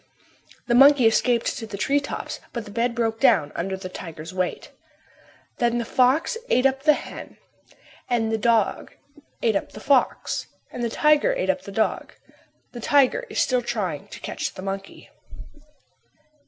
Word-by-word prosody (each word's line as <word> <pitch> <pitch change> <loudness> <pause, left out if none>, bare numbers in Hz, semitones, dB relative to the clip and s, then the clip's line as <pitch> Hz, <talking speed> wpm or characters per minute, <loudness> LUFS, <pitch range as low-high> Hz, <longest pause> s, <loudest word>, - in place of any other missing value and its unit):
The 240 - 0
monkey 270 0 +7
escaped 230 +1 +2
to 225 - -7
the 200 -2 -7
tree 280 +7 +2
tops, 285 - -6
but 235 -3 -4
the 205 - -10
bed 235 +2 -1
broke 225 -2 -1
down 145 -7 +3
under 190 +2 -3
the 190 -1 -7
tiger's 165 -2 -9
weight. 185 -1 -3 0.9
Then 240 0 +1
the 235 - -2
fox 265 - +2
ate 255 - +3
up 270 0 +2
the 300 +1 +5
hen - - -8 0.7
and 225 -2 0
the 220 - +1
dog 230 -2 +1 0.5
ate 225 -3 +2
up - - -3
the - - -9
fox 270 +3 +1 0.2
and 245 - -5
the 235 - 0
tiger 300 - +3
ate - - +1
up - - -6
the - - -10
dog. - - -1 0.6
The 240 - -8
tiger 290 - +3
is - - -3
still 250 -1 +2
trying 210 -11 -3
to - - -10
catch - - -4
the 185 - -8
monkey. 195 0 -7
235 Hz, 170 wpm, -24 LUFS, 205-265 Hz, 0.9 s, monkey